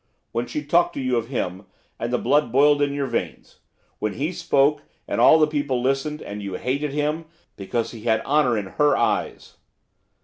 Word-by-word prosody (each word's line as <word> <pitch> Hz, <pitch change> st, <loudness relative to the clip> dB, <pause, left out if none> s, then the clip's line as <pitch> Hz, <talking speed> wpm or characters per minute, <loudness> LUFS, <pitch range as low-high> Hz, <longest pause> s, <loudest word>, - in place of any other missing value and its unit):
When 120 Hz, +1 st, -2 dB
she 150 Hz, +5 st, -4 dB
talked 170 Hz, +4 st, +2 dB
to -, -, -3 dB
you 130 Hz, -2 st, 0 dB
of 115 Hz, -1 st, -2 dB
him, 95 Hz, -7 st, -4 dB, 0.3 s
and 120 Hz, -, -3 dB
the 125 Hz, -, +2 dB
blood 145 Hz, -3 st, +1 dB
boiled 145 Hz, +3 st, +4 dB
in 145 Hz, -1 st, +2 dB
your 140 Hz, 0 st, -2 dB
veins; 130 Hz, -, -5 dB, 0.4 s
when 105 Hz, -1 st, -2 dB
he 150 Hz, +5 st, -2 dB
spoke, 150 Hz, -4 st, +2 dB, 0.3 s
and -, -, -1 dB
all 160 Hz, -, +7 dB
the 155 Hz, -, +5 dB
people 145 Hz, -4 st, -1 dB
listened, 135 Hz, +4 st, -1 dB
and 105 Hz, +1 st, -7 dB
you 100 Hz, -2 st, -5 dB
hated 140 Hz, +6 st, -2 dB
him, 150 Hz, +3 st, -1 dB, 0.3 s
because 110 Hz, +4 st, -3 dB
he 115 Hz, -, -10 dB
had 110 Hz, -1 st, +2 dB
honour 135 Hz, -5 st, +2 dB
in 105 Hz, -, -2 dB
her 145 Hz, +9 st, +2 dB
eyes. -, -, -2 dB
135 Hz, 195 wpm, -23 LUFS, 115-150 Hz, 0.4 s, all